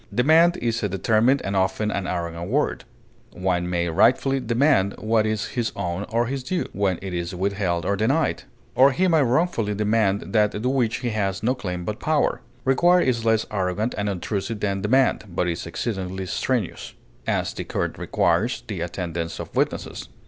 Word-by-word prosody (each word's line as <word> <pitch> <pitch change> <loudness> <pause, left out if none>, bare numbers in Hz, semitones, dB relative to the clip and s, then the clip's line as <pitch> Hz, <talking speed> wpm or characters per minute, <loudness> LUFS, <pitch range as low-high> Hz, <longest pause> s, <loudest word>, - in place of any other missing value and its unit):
Demand 160 +7 +4
is 115 -1 -1
a 105 - 0
determined 115 +7 +2
and 100 - -2
often 95 +3 +1
an 95 -2 -2
arrogant 85 0 -3
word; 145 +6 0 0.5
one 90 -1 -1
may 85 -1 0
rightfully 130 +10 +3
demand 115 -5 +2
what 110 0 +1
is 110 -1 -2
his 120 -2 -2
own 90 0 -3
or 115 +2 +1
his 135 +2 -3
due, 175 +8 -2
when 95 -3 0
it 95 -2 -5
is 85 +1 -3
withheld 95 -3 -1
or 100 - +1
denied; 135 +10 +1 0.3
or 135 +1 +5
he 185 +8 +2
may 165 -3 +4
wrongfully 125 -5 +1
demand 105 -2 +1
that 105 -1 +3
to - - -4
which 125 -4 0
he 120 -2 -1
has 100 -2 -1
no 125 +3 +2
claim 90 -8 -5
but 105 +2 -4
power. 155 -1 +1 0.2
Require 175 +7 +4
is 115 -5 0
less 110 -1 +3
arrogant 100 +3 -1
and 105 0 -1
obtrusive 100 +3 -3
than 100 -1 -1
demand, 130 +2 +2
but 90 0 -1
is 85 -1 -3
exceedingly 95 0 -3
strenuous; 110 +1 -2 0.3
as, - - 0
the - - -5
court - - -3
requires 90 +8 +1
the 100 -7 -5
attendance 85 -1 -4
of - - -8
witnesses. - - -2
105 Hz, 180 wpm, -23 LUFS, 95-125 Hz, 0.5 s, or